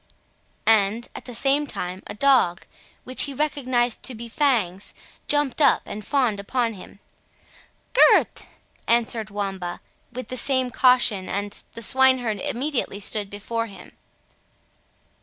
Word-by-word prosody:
and, 220 +1 +2
at - - -10
the 245 - -7
same 285 +4 +2
time, 180 -6 -4
a - - -7
dog, 245 -9 +2 0.4
which 255 +1 +2
he 280 -2 -6
recognised 255 -5 0
to 255 - -3
be 235 +1 -8
Fangs, 230 - -1 0.3
jumped 290 -1 0
up 285 - +4
and 210 - -7
fawned 250 -7 0
upon 230 +3 -1
him. 195 0 -13 1.0
"Gurth!" - - +4 0.4
answered 230 -2 +1
Wamba, 195 -4 -4 0.3
with 255 +1 -8
the 255 - -3
same 260 -1 0
caution, 245 -7 +3
and 205 +1 -4
the 230 - -1
swineherd 260 -4 +4
immediately 275 -5 -3
stood 205 0 0
before 230 +3 -4
him. 200 - -13
235 Hz, 130 wpm, -23 LUFS, 205-265 Hz, 1.0 s, up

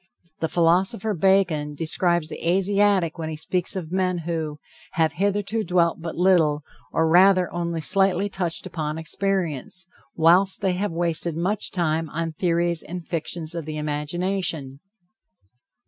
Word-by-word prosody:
The 160 - 0
philosopher 185 +5 +2
Bacon 175 -5 +2
describes 170 +1 0
the 165 - -3
Asiatic 195 -2 +2
when 160 -1 -3
he 160 - -4
speaks 180 +5 -2
of 175 -4 -5
men 185 -1 0
who 160 -3 -3 0.4
"have 160 -3 +1
hitherto 205 +5 -1
dwelt 170 -2 +1
but 165 -1 -5
little, 165 -5 +3 0.3
or 160 - +1
rather 185 +1 +5
only 170 -1 -2
slightly 195 +3 +2
touched 180 -4 -3
upon 155 -2 -4
experience, 180 0 -1 0.3
whilst 180 +4 +4
they 190 -2 +1
have 195 +2 -2
wasted 170 -1 -1
much 195 +5 -1
time 160 -3 -1
on 165 0 -3
theories 170 0 0
and 175 -1 -8
fictions 165 -1 -3
of 170 -3 -5
the 155 0 -5
imagination." 150 -1 -2
170 Hz, 140 wpm, -23 LUFS, 160-190 Hz, 0.4 s, rather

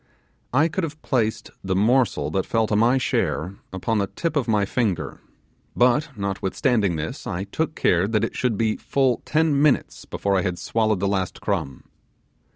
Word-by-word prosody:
I 145 +6 +4
could 175 +3 -3
have 155 -1 -5
placed 110 -4 -1
the 95 -1 -1
morsel 110 - +2
that 95 -1 -1
fell 115 -1 +2
to 105 - -1
my 120 +5 +4
share 100 -6 -1
upon 95 +4 -1
the 100 - 0
tip 165 - -3
of 140 -5 0
my 105 -3 +2
finger; 105 -3 -2 0.5
but 125 +4 +3
notwithstanding 100 - 0
this 80 0 -5
I 90 +2 -3
took 155 +11 -3
care 90 +2 +2
that 110 -1 +1
it - - -2
should 125 -5 0
be 110 0 +1
full 130 -3 +1
ten 155 -2 +2
minutes 150 -3 +1
before 100 -1 -1
I 95 - +3
had 90 -2 -2
swallowed 110 -2 0
the 100 - +1
last 95 -2 -1
crumb. 70 -2 -3
110 Hz, 175 wpm, -23 LUFS, 95-130 Hz, 0.5 s, I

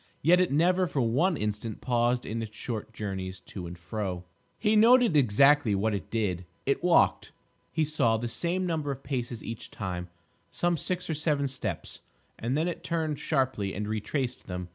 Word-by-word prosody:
Yet 175 +5 +6
it 180 - +1
never 180 +5 +3
for 150 -5 -1
one 145 +10 +2
instant 105 +1 -3
paused 120 0 +1
in 115 +2 -3
its 110 -1 -7
short 110 -3 -4
journeys 95 -4 -5
to 90 -1 -7
and 85 +1 -8
fro. 90 0 -4 0.3
He 220 0 +2
noted 235 -3 +6
exactly 135 -1 +5
what 105 +3 +1
it 100 -5 -4
did: 100 -6 -1 0.2
it - - 0
walked, - - +3 0.4
he 160 -1 +1
saw, 135 -7 +2
the 120 +2 -3
same 175 +9 -1
number 160 -4 -1
of 135 -1 -4
paces 120 -5 -3
each 115 -1 -6
time, 90 -3 -5 0.4
some 175 0 0
six 180 +3 -2
or 160 - -1
seven 150 -2 +1
steps, 110 -9 -4 0.4
and 125 +5 -1
then 160 +3 +1
it 175 - -4
turned 160 -3 -1
sharply 130 -9 0
and 105 +2 -3
retraced 110 +5 -2
them. 90 -1 -5
120 Hz, 180 wpm, -28 LUFS, 105-155 Hz, 0.4 s, Yet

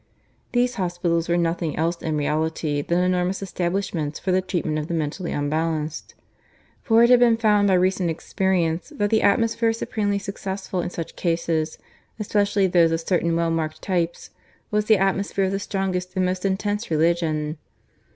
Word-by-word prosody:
These 245 0 +1
hospitals 175 -2 -1
were 170 - +3
nothing 170 -2 -1
else 170 +2 -1
in 155 -2 -1
reality 155 0 -1
than 175 +4 +1
enormous 180 +1 0
establishments 175 -5 -2
for 190 - -2
the 185 +1 +3
treatment 160 -4 -2
of 150 - -4
the 170 - -2
mentally 160 +3 -3
unbalanced; 155 +1 -2 0.7
for 230 0 +4
it 235 - +5
had 250 - +7
been 235 -2 +5
found 210 -2 +3
by 190 - +4
recent 185 -1 +2
experience 170 - -1
that 205 -6 0
the 220 - +3
atmosphere 230 +2 +2
supremely 205 -2 -1
successful 195 -2 -4
in 175 - -3
such 165 -2 -6
cases 165 -2 -1 0.4
especially 205 -2 +1
those 175 -2 +4
of 165 - 0
certain 170 -1 0
well 165 0 +1
marked 160 -1 -2
types 175 -3 -2 0.4
was 210 0 +1
the 215 -1 +5
atmosphere 195 +1 0
of 190 - -1
the 195 - -1
strongest 190 -2 -3
and 185 -1 +2
most 185 +1 -2
intense 205 +3 -1
religion. 155 -1 0
180 Hz, 165 wpm, -23 LUFS, 165-200 Hz, 0.7 s, had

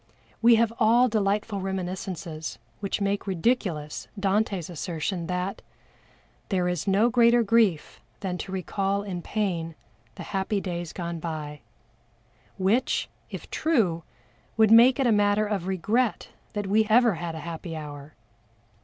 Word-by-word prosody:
We 235 0 +7
have 230 0 +2
all 235 +3 +5
delightful 210 -2 0
reminiscences 180 - -4 0.2
which 200 +1 -3
make 200 +1 -1
ridiculous 180 -6 -1
Dante's 195 -3 0
assertion 170 +1 -3
that 180 +2 -3 0.9
"There 180 -3 +1
is 180 -1 -2
no 205 +5 +3
greater 235 0 +5
grief 210 -7 +1 0.2
than 180 -2 -3
to 190 - -6
recall 195 +1 -1
in 185 -4 -5
pain 170 -6 -2 0.4
The - - -7
happy 195 +1 -1
days 175 -3 -4
gone 170 -2 -5
by;" 155 -3 -5 1.0
which, 205 +7 +1 0.2
if - - -8
true, 220 - +1 0.6
would 220 -1 +5
make 240 +4 +7
it 270 - +2
a 240 - +4
matter 205 0 +3
of 200 -4 -2
regret 210 +6 0 0.2
that 205 -1 -2
we 215 +3 +3
ever 235 0 +5
had 170 -1 -5
a - - -5
happy 165 0 -6
hour. 145 -1 -9
195 Hz, 135 wpm, -26 LUFS, 170-215 Hz, 1.0 s, We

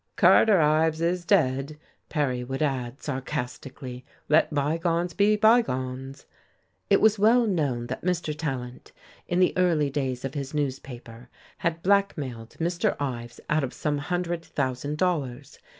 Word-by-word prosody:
"Carter 210 -4 +6
Ives 155 +1 +3
is 175 +1 0
dead," 145 -5 +1 0.3
Perry 130 -5 -1
would 135 +4 -3
add, 130 -2 -3
sarcastically, 130 -2 -5 0.3
"let 155 +2 +4
bygones 165 +4 0
be 205 +3 +3
bygones." 135 - +1 0.6
It - - +5
was 220 -1 +4
well 230 +4 +5
known 145 - 0
that - - -5
Mr. 175 -4 -1
Tallant, 130 -5 -5 0.3
in 175 - 0
the 185 - +3
early 165 -6 +2
days 135 -3 -2
of 135 - -4
his 140 0 -5
newspaper, 125 -4 -5 0.3
had 170 -2 -2
blackmailed 145 - 0
Mr. 170 +1 0
Ives 120 -4 -4
out 150 -1 +1
of 130 - -4
some 150 -2 -1
hundred 175 +2 -2
thousand 140 0 -3
dollars. 145 -7 -2
150 Hz, 135 wpm, -26 LUFS, 130-175 Hz, 0.6 s, Carter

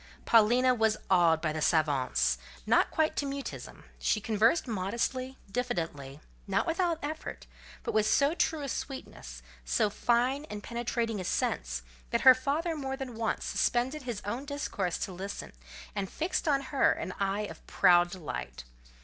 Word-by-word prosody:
Paulina 240 +3 +5
was 220 -2 +2
awed 170 -3 +4
by 155 -2 0
the 155 - -3
savants, 130 - +2 0.2
but - - -26
not - - +4
quite 315 -1 +1
to 285 - 0
mutism: 275 0 -6 0.2
she 215 - +1
conversed 225 +8 +2
modestly, 235 +6 -2
diffidently; 165 - -3 0.3
not 195 0 +1
without 340 0 +1
effort, 310 +2 -5 0.4
but - - -3
with 215 0 +3
so 280 +6 +3
true 320 -3 0
a - - -3
sweetness, 60 - -6 0.2
so 135 - +1
fine 250 +7 +1
and 210 -6 -7
penetrating 235 -2 -2
a - - -4
sense, - - -1 0.3
that - - 0
her 260 - +10
father 290 +6 -1
more 270 -3 -4
than 265 -3 -6
once 225 0 -2
suspended 260 +5 0
his 240 -5 -5
own 230 +6 -3
discourse 275 - -2
to 195 - -4
listen, 195 +3 -6 0.4
and 200 -2 -3
fixed 340 +1 -2
on 280 -2 +3
her 275 - +4
an 185 - -5
eye 200 +1 0
of 210 - -7
proud 175 -1 +5
delight. 150 - -6
225 Hz, 160 wpm, -30 LUFS, 180-270 Hz, 0.4 s, her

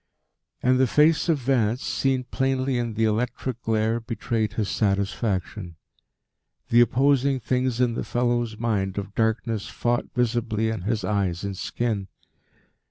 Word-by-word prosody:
And 130 +1 +3
the 130 - +4
face 150 +6 +3
of 160 - +4
Vance, 125 -3 +1
seen 135 -1 0
plainly 130 0 0
in 120 -2 -3
the 110 - +1
electric 120 +2 -1
glare, 110 +1 +1
betrayed 110 -2 -2
his 110 -3 -1
satisfaction. 100 -1 -1 0.9
The 120 +1 +6
opposing 135 +2 +3
things 125 0 -1
in 125 -2 +2
the - - -3
fellow's 120 -2 0
mind 105 -4 -1
of 100 0 -4
darkness 110 -1 -1
fought 120 0 -1
visibly 115 -2 0
in 110 - -4
his 110 -2 0
eyes 95 -4 -1
and 100 -1 -3
skin. 105 0 -2
115 Hz, 140 wpm, -25 LUFS, 105-125 Hz, 0.9 s, The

